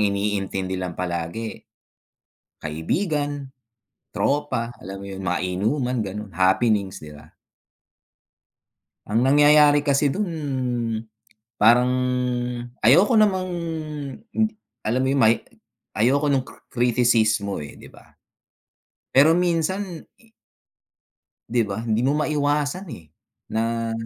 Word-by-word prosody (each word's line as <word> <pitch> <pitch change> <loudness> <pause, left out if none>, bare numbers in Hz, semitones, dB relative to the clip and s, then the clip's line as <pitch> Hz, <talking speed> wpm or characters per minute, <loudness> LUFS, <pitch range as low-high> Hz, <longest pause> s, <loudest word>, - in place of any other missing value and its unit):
iniintindi 100 -2 -1
lang 90 -2 -5
palagi, 90 +5 -4 1.0
kaibigan, 145 - -2 0.6
tropa, 125 -5 -1
alam 95 +2 -7
mo 100 - -9
yun, 95 -1 -7
mga 90 -2 0 0.2
inuman, 125 +6 0
ganon, 105 -1 -6
happenings, 95 +2 +2
'di 75 -1 -11
ba? 75 - -15 1.8
Ang 115 +4 +2
nangyayari 145 +1 +6
kasi 140 -1 +2
dun 200 +2 -2 1.3
parang 120 +4 +5 0.9
ayoko 170 - +5
namang 190 -3 +2 1.3
alam 115 +4 0
mo - - +1
yun 140 - +1
may 115 -1 +5 0.6
ayoko 140 +6 +2
ng 135 -2 +2
cric - - -15
criticismo 115 -4 +2
eh, 75 -1 -9
'di - - -14
ba? - - -18 1.1
Pero 155 +5 +6
minsan 175 +1 -1 1.4
'Di 120 +1 +1
ba, 100 - -3
hindi 110 +1 +1
mo 135 - +3
maiwasan, 150 +3 0
eh, 80 - -10 0.4
na 115 0 -1
120 Hz, 100 wpm, -23 LUFS, 100-145 Hz, 1.8 s, nangyayari